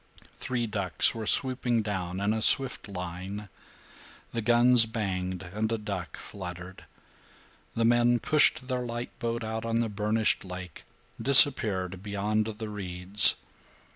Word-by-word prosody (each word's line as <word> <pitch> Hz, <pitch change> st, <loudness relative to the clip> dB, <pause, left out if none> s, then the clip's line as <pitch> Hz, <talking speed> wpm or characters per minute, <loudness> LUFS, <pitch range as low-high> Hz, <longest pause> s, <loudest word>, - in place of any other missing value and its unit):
Three 125 Hz, -2 st, -3 dB
ducks 100 Hz, -4 st, +1 dB
were 110 Hz, -2 st, -7 dB
swooping 125 Hz, -3 st, 0 dB
down 95 Hz, -3 st, -4 dB
in 100 Hz, +2 st, 0 dB
a 110 Hz, -, -3 dB
swift 135 Hz, +1 st, +2 dB
line. 95 Hz, +2 st, -7 dB, 0.8 s
The 115 Hz, -, -3 dB
guns 120 Hz, +1 st, +4 dB
banged, 95 Hz, -4 st, -4 dB
and 110 Hz, +2 st, -2 dB
a 115 Hz, -, -1 dB
duck 100 Hz, -4 st, -7 dB
fluttered. 90 Hz, -1 st, -10 dB, 0.9 s
The 115 Hz, -, 0 dB
men 120 Hz, +1 st, +3 dB
pushed 135 Hz, 0 st, +2 dB
their 125 Hz, -2 st, -3 dB
light 120 Hz, 0 st, -6 dB
boat 115 Hz, 0 st, -3 dB
out 110 Hz, 0 st, -5 dB
on 115 Hz, 0 st, -3 dB
the 115 Hz, -1 st, 0 dB
burnished 105 Hz, +1 st, -1 dB
lake, 90 Hz, -2 st, -10 dB, 0.4 s
disappeared 105 Hz, -10 st, +4 dB
beyond 105 Hz, +1 st, -2 dB
the 110 Hz, 0 st, -7 dB
reeds. 95 Hz, -1 st, +4 dB
110 Hz, 135 wpm, -27 LUFS, 95-120 Hz, 0.9 s, guns